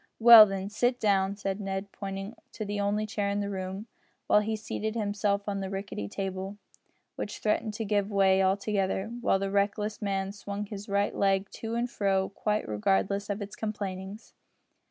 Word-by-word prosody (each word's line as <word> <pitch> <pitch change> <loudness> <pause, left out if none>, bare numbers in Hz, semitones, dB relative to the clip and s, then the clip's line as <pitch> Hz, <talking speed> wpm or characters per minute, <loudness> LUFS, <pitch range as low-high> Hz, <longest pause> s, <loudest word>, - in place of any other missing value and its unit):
"Well, 230 -2 +10
then, 195 -1 -3
sit 245 +4 0
down," 200 -2 +2
said 195 -1 -3
Ned, 195 0 -4
pointing 195 +1 -6 0.2
to 215 - -4
the 205 0 -3
only 205 +1 0
chair 205 -1 -2
in 200 0 -1
the 200 0 -2
room, 190 +2 -5 0.4
while - - +5
he 220 +1 -1
seated 220 0 -4
himself 205 -1 0
on 200 -1 -1
the 190 -1 -4
rickety 195 - -4
table, 190 - -4 0.6
which 210 - -4
threatened 215 0 0
to 225 - -3
give 205 -1 +1
way 195 -1 +4
altogether, 195 +1 0
while 235 - +3
the 195 0 -2
reckless 205 +1 0
man 195 -1 -1
swung 205 0 -5
his 205 0 -8
right 200 +1 +1
leg 195 0 +1
to 225 0 -5
and 240 +1 0
fro 195 -2 +1
quite 210 +1 -1
regardless 105 - 0
of 205 +1 -2
its 200 - -9
complainings. 200 -1 -5
200 Hz, 175 wpm, -29 LUFS, 195-210 Hz, 0.6 s, Well